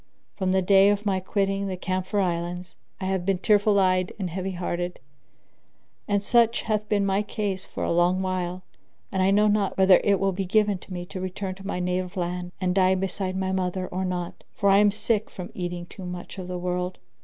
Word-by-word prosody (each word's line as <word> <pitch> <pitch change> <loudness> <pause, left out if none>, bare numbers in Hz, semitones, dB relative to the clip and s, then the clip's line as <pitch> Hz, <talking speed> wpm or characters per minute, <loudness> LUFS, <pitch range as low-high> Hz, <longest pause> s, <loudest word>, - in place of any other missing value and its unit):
From 190 -2 0
the 190 0 +2
day 195 +1 +6
of 205 +1 0
my 195 -2 +1
quitting 195 +1 -1
the 185 -1 -3
Camphor 185 +2 -1
Islands, 175 -1 -2 0.3
I 190 - -4
have 190 -1 0
been 195 0 +1
tearful 205 +1 +3
eyed 185 -1 +2
and 185 -4 -3
heavy 190 +2 -3
hearted, 175 0 -3 1.1
and 205 -1 +1
such 235 +1 +3
hath 215 -2 -1
been 205 -2 +2
my 195 +1 +2
case 205 -2 -3
for - - -5
a - - 0
long 175 +2 +3
while 185 -1 -2 0.5
and 190 - 0
I 190 - +4
know 205 +2 +4
not 205 -1 +1
whether 190 -1 +6
it 200 -2 +3
will 195 0 +2
be 195 +1 -2
given 205 0 +2
me 175 -2 -5
to 185 +1 -7
return 185 +1 -4
to 195 +1 -10
my 180 - -2
native 180 +1 -2
land 180 0 -3
and 180 -1 0
die 190 0 +4
beside 190 0 -2
my 190 0 -1
mother 185 0 -1
or 185 +1 -2
not; 180 -2 -4
for 200 -1 +3
I 195 - +6
am 205 0 +6
sick 215 +1 -1
from 180 -1 -8
eating 175 -1 -4
too 185 +1 -9
much 180 +2 -7
of 180 - -6
the 180 0 -4
world. 180 0 -2
185 Hz, 210 wpm, -25 LUFS, 180-200 Hz, 1.1 s, day